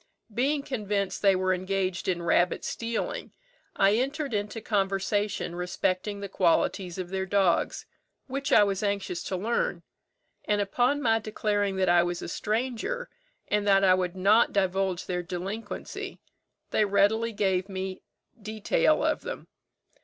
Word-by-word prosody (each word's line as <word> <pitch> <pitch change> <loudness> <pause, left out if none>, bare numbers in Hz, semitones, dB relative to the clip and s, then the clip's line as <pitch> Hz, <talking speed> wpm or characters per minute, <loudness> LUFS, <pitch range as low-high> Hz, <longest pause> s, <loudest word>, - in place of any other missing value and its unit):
Being 275 +5 +1
convinced 210 -7 -2
they 195 -2 +5
were 185 0 +1
engaged 185 -1 -2
in 175 -2 0
rabbit 175 +1 +2
stealing, 230 - -3 0.4
I 200 - +4
entered 275 +1 -2
into 210 +2 -2
conversation 200 -2 -1
respecting 185 +3 -1
the 200 - -4
qualities 180 0 +1
of 185 -2 -4
their 190 0 -2
dogs, 190 -3 +1 0.4
which 275 +2 -3
I 210 - +7
was 195 -2 0
anxious 200 -4 -1
to 185 - -2
learn; 235 - -1 0.6
and 210 -1 +1
upon 245 +8 +1
my 225 -2 +3
declaring 205 -2 -1
that 190 -1 +1
I 175 0 +6
was 175 0 -2
a - - -4
stranger, 245 - -2 0.4
and 210 0 0
that 195 -1 +5
I 185 -1 +6
would 185 -1 0
not 205 +5 +4
divulge 190 -2 0
their 180 -1 -2
delinquency, 185 +5 -6 0.5
they - - +3
readily 205 +3 +2
gave 190 -2 0
me 190 0 -4 0.3
a - - -26
detail 215 - +1
of - - +1
them. - - -7
200 Hz, 145 wpm, -27 LUFS, 185-220 Hz, 0.6 s, I